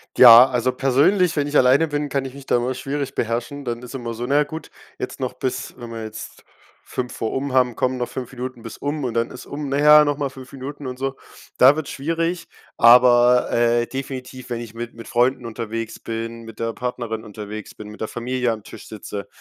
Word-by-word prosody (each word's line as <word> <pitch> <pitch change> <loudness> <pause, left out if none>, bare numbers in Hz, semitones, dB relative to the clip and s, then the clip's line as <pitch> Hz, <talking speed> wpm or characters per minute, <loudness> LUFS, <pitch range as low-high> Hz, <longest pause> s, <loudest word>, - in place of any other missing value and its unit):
Ja, 125 +1 +10
also 125 +1 +1
persönlich, 150 +8 +2
wenn 145 -1 0
ich 145 - +1
alleine 130 +5 +5
bin, 145 -1 -2
kann 135 -1 -1
ich 130 - -7
mich 140 -1 -11
da - - +3
immer 125 +2 -1
schwierig 140 +1 -4
beherrschen, 120 +5 -3
dann 120 0 -3
ist 125 - -9
immer 120 -3 -5
so: 120 +2 -4
„Na 140 +3 0
ja 150 - +5
gut, 160 +2 -8 0.3
jetzt 125 - -6
noch 130 -1 -2
bis“, 130 0 -4
wenn 120 -1 -9
wir 115 -1 -6
jetzt 110 0 -9 0.4
5 125 -1 -5
vor 110 - -3
um 135 0 -2
haben: 125 -2 +3
„Komm, 130 0 0
noch 125 - -3
5 125 -1 -6
Minuten 125 -2 -7
bis 115 - -8
um“ 145 0 -3
und 125 - -2
dann 115 0 0
ist - - -10
um: 145 0 -5
„Na 140 - 0
ja, 150 +1 +7
noch 145 -1 0
mal 145 -2 -1
5 130 0 -12
Minuten“ 140 +1 -7
und 125 - -6
so. 135 +1 -3 0.4
Da 130 +3 +8
wird's 155 -3 -4
schwierig. 165 +4 -2 0.3
Aber, 120 +1 +6
äh, 120 0 +2
definitiv, 130 -1 -7
wenn 120 -1 -3
ich 115 -2 -9
mit 120 0 -7
mit 115 -1 -10
Freunden 125 +1 +1
unterwegs 115 -1 -5
bin, 115 0 -5
mit 115 -1 -12
der 115 0 -2
Partnerin 120 -3 -4
unterwegs 105 0 -8
bin, 105 -1 -9
mit 105 - -12
der 110 - -1
Familie 125 +1 -1
am 110 -2 -5
Tisch - - -12
sitze, 100 -1 -7
125 Hz, 225 wpm, -22 LUFS, 115-135 Hz, 0.4 s, Ja